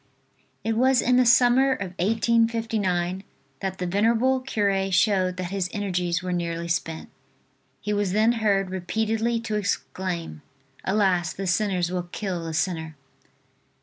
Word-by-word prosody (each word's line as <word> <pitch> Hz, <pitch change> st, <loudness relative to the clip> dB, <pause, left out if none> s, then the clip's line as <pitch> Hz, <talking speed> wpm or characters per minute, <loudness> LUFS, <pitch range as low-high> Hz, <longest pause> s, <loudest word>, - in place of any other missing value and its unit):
IT 225 Hz, +2 st, 0 dB
was 255 Hz, +2 st, +4 dB
in 250 Hz, +1 st, +3 dB
the 255 Hz, -1 st, +4 dB
summer 250 Hz, +2 st, +5 dB
of 190 Hz, -7 st, -5 dB
1859, 220 Hz, -4 st, +1 dB, 0.4 s
that 190 Hz, -1 st, -3 dB
the 180 Hz, -, -3 dB
venerable 230 Hz, +8 st, +2 dB
cure 200 Hz, -6 st, 0 dB
showed 185 Hz, -1 st, +2 dB
that 185 Hz, 0 st, -4 dB
his 190 Hz, -2 st, -1 dB
energies 180 Hz, -4 st, -1 dB
were 180 Hz, -1 st, -2 dB
nearly 170 Hz, -1 st, -2 dB
spent. 165 Hz, -1 st, -3 dB, 0.7 s
He 210 Hz, -, -2 dB
was 205 Hz, -2 st, 0 dB
then 215 Hz, +4 st, +3 dB
heard 195 Hz, -3 st, +1 dB
repeatedly 220 Hz, +5 st, -1 dB
to 220 Hz, -2 st, -2 dB
exclaim: 185 Hz, -5 st, -3 dB, 0.4 s
"Alas, 190 Hz, -4 st, +1 dB
the 195 Hz, -, -5 dB
sinners 180 Hz, -2 st, 0 dB
will 180 Hz, -1 st, -3 dB
kill 185 Hz, -5 st, -3 dB
the 160 Hz, -1 st, -4 dB
sinner." 160 Hz, -2 st, -2 dB
195 Hz, 140 wpm, -25 LUFS, 180-225 Hz, 0.7 s, summer